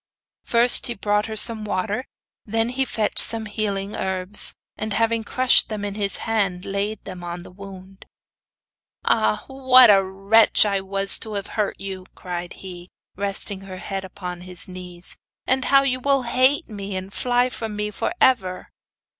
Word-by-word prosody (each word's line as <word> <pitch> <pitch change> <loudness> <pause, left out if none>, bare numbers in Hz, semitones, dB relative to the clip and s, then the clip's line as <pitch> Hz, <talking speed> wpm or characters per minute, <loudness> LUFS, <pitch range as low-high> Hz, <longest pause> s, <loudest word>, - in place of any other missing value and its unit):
First 240 +2 +4
he 240 - -4
brought 210 +1 0
her 220 -1 -5
some 220 0 +4
water, 210 +5 -2 0.4
and 215 - -13
then 225 +1 +1
he 265 +2 -1
fetched 215 -4 -1
some 225 -1 +5
healing 205 -1 -3
herbs, 190 +2 -1 0.2
and 215 0 -4
having 230 0 +1
crushed 255 +3 +3
them 210 -2 -4
in 200 - -4
his 200 -1 +1
hand, 200 -5 -1
laid 200 +2 -3
them 185 -2 -8
on 175 0 -6
the - - -13
wound. 195 0 -12 1.0
'Ah! 215 -1 +1
what 260 -3 +6
a 195 -1 +5
wretch 195 +4 +3
I 200 -2 0
was 195 +1 0
to 220 - -7
have 200 -2 -3
hurt 210 -2 -2
you,' 190 -1 -7
cried 175 -1 -6
he, 180 -1 -9 0.3
resting 200 0 -3
her 190 -1 -9
head 195 +1 -4
upon 180 -2 -7
his 180 -1 -4
knees; 180 -1 -7 0.3
'and 260 +1 +1
now 275 0 +6
you 255 -2 -1
will 275 0 +1
hate 255 +4 +3
me 200 -2 -6
and 190 +1 -6
fly 245 0 +1
from 220 -3 -5
me 210 0 -3
for - - -3
ever! 190 -8 +1
205 Hz, 170 wpm, -22 LUFS, 190-225 Hz, 1.0 s, what